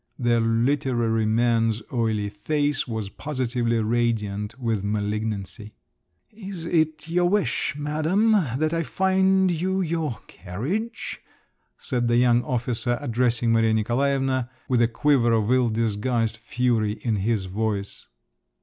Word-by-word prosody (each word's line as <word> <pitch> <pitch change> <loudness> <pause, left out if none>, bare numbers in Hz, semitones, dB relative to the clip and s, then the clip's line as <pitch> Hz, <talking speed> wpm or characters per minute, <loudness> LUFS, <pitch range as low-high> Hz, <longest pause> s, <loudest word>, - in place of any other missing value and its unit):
The 120 -2 +2
"literary 115 -1 +1
man's" 115 -1 +1
oily 110 -4 0
face 145 +7 -1
was 110 -4 -4
positively 120 -2 -2
radiant 110 -2 -1
with 115 -5 -1
malignancy. 105 0 -3 0.6
"Is 195 -6 -8
it 155 -2 0
your 175 +1 +2
wish, 200 -7 0
madam, 155 +9 +1 0.3
that 155 +2 0
I 165 - +1
find 190 +3 +2
you 185 +3 0
your 160 -8 -2
carriage?" 135 - -5 0.6
said 120 -3 -1
the 120 0 +3
young 120 -1 +4
officer 120 0 -1
addressing 120 -3 +1
Maria 115 -1 +3
Nikolaevna 130 +2 0 0.2
with 125 -2 +2
a 120 - +5
quiver 120 -1 +2
of 110 0 +1
ill 125 -2 +3
disguised 115 +1 0
fury 115 -2 0
in 115 -3 0
his 100 0 0
voice. 100 +1 -3
120 Hz, 120 wpm, -24 LUFS, 110-145 Hz, 0.6 s, a